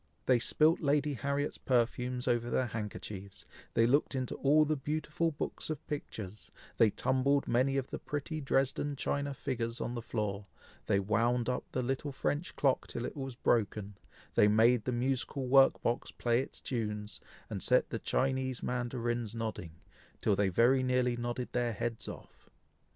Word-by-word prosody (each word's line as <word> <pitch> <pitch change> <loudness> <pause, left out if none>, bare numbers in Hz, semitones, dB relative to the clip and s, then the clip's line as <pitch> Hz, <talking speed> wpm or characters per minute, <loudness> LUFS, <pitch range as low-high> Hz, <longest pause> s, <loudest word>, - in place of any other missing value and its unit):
They 125 -2 +4
spilt 155 +7 +3
Lady 145 0 +1
Harriet's 140 +3 -2
perfumes 125 0 0
over 120 -1 +1
their 130 - +1
handkerchiefs, 105 -3 -6 0.3
they 115 - +5
looked 140 +3 +2
into 130 -2 -2
all 150 +2 +4
the 155 +1 +1
beautiful 150 +3 -1
books 150 0 -4
of 155 - -4
pictures, 110 -8 -6 0.3
they 115 - +6
tumbled 135 +6 +1
many 130 +3 +2
of 135 -1 -2
the - - -4
pretty 150 +2 -4
Dresden 135 +1 0
china 140 +1 -2
figures 115 -4 -3
on 120 - -3
the 120 - -3
floor, 105 -3 -3 0.4
they 100 - +3
wound 115 +4 +1
up 125 - -2
the 130 - -1
little 135 +3 -2
French 145 +4 -2
clock 135 -3 +1
till 120 - -4
it - - -5
was 135 -3 -5
broken, 105 -4 0 0.4
they 105 - +5
made 110 +2 +4
the 125 - 0
musical 130 +2 -1
work 135 +1 +6
box 120 - 0
play 120 +1 +1
its - - -8
tunes, 105 -4 -3 0.3
and - - -5
set - - +3
the - - -2
Chinese 130 -1 -1
mandarins 120 -2 -2
nodding, 110 -8 -4 0.5
till 105 - +2
they 100 0 +2
very 120 +8 +4
nearly 125 -1 +2
nodded 120 +1 -3
their 120 -1 0
heads 115 +2 -3
off. - - -11
125 Hz, 165 wpm, -32 LUFS, 115-135 Hz, 0.5 s, they